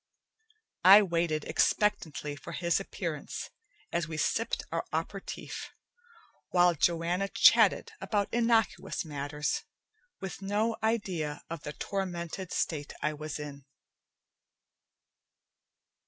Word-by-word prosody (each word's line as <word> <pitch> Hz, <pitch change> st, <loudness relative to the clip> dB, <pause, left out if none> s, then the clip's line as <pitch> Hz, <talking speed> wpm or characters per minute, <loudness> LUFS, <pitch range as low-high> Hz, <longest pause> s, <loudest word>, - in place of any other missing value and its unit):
I 195 Hz, +4 st, +10 dB
waited 170 Hz, -4 st, 0 dB
expectantly 160 Hz, -8 st, +1 dB
for 170 Hz, -, -9 dB
his 170 Hz, +3 st, +1 dB
appearance 170 Hz, -6 st, -5 dB, 0.4 s
as 170 Hz, -2 st, 0 dB
we 160 Hz, -1 st, -5 dB
sipped 225 Hz, +9 st, 0 dB
our -, -, -1 dB
aperitif, -, -, -4 dB, 0.8 s
while 175 Hz, -1 st, +5 dB
Joanna 170 Hz, +4 st, +1 dB
chatted 455 Hz, -, +5 dB
about 205 Hz, -2 st, 0 dB
innocuous 230 Hz, -6 st, +1 dB
matters, 150 Hz, 0 st, -2 dB, 0.6 s
with 190 Hz, 0 st, -6 dB
no 210 Hz, +3 st, 0 dB
idea 190 Hz, -10 st, -1 dB
of 165 Hz, -3 st, -4 dB
the 150 Hz, -, -6 dB
tormented 180 Hz, 0 st, -4 dB
state 150 Hz, -3 st, -2 dB
I 150 Hz, -, +1 dB
was 155 Hz, 0 st, -5 dB
in. 145 Hz, -2 st, -7 dB
170 Hz, 100 wpm, -30 LUFS, 150-195 Hz, 0.8 s, I